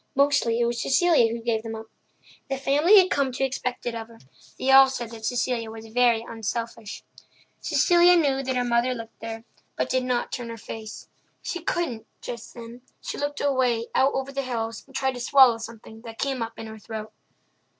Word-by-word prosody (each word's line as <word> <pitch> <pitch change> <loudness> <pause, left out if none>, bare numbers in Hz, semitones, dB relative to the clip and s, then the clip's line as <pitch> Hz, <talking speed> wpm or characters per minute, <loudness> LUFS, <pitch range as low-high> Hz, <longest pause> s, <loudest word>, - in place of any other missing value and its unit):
Mostly 280 -4 +2
it 240 - +3
was 235 0 -1
Cecilia 310 -6 +3
who 230 0 -5
gave 225 -2 0
them 225 0 -6
up. 220 0 -8 0.6
The 270 - -1
family 295 +9 +5
had 370 -1 +5
come 275 -2 +1
to 270 - -2
expect 255 -1 -3
it 240 - -2
of 225 -1 -6
her; 230 -1 -16 0.4
they 265 - +1
all 270 0 +9
said 240 -3 -5
that 225 -1 -8
Cecilia 240 -1 -1
was 225 0 -9
very 235 -1 +2
unselfish. 230 0 -5 0.6
Cecilia 350 0 +4
knew 275 -5 +2
that 260 -1 -2
her 250 - +1
mother 240 +1 +1
looked 225 -1 -10
at 225 - -4
her, 225 0 -8 0.3
but - - -2
did 255 0 +1
not 250 -1 -1
turn 240 -2 -5
her 230 - -7
face. 220 0 -9 0.4
She 350 - -4
couldn't, 310 -9 -2
just 235 -2 -8
then; 235 +1 -10 0.2
she - - -6
looked 290 0 -3
away 255 -5 +1
out 270 +1 +3
over 270 +1 -3
the 275 0 -2
hills 230 -3 -4
and 270 - -18
tried 265 -1 0
to 245 - -7
swallow 250 -2 +5
something 225 -1 -10
that 225 -1 -10
came 270 -3 -2
up 230 0 -5
in 225 - -7
her 220 0 -9
throat. 215 0 -7
240 Hz, 205 wpm, -25 LUFS, 225-270 Hz, 0.6 s, all